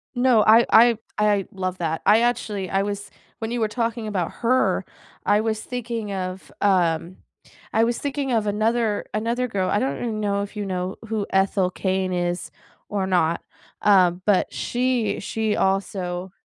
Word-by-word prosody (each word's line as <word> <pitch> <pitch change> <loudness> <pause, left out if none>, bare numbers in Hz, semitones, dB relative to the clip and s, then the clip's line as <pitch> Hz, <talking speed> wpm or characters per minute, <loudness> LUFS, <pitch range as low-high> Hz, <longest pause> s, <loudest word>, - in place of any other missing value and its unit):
No, 245 -3 +4
I 225 +3 +6
I 225 - +8
th 225 - -13 0.2
I 210 -2 +2
love 185 -1 -3
that, 160 -2 -2
I 215 +3 +6
actually 215 -6 -1
I 195 0 +1
was 205 0 -4 0.3
when 225 0 -4
you 240 - -1
were 220 - +2
talking 230 0 -2
about 190 -5 -2
her, 255 +2 +2 0.4
I 210 - +3
was 220 -1 -1
thinking 235 -3 -4
of, 185 0 -5
um 175 -3 +1 0.6
I 220 - +4
was 235 0 +1
thinking 280 -2 -2
of 220 -3 +1
another 215 +1 0
another 235 +4 -1
girl, 195 -5 -1
I - - +2
don't 140 +1 -1
even 225 -3 -3
know 200 -1 0
if 205 - -9
you 205 -1 -3
know 185 0 -3
who 215 -2 -2
Ethel 190 -1 +2
Cain 190 0 -1
is 175 0 -2 0.4
or 195 -2 -1
not, 170 -3 +1 0.4
uh, 190 -4 +5
but 185 +2 0
she 245 -4 0
she 220 +1 -1
also 190 -2 -1
205 Hz, 170 wpm, -23 LUFS, 185-225 Hz, 0.6 s, I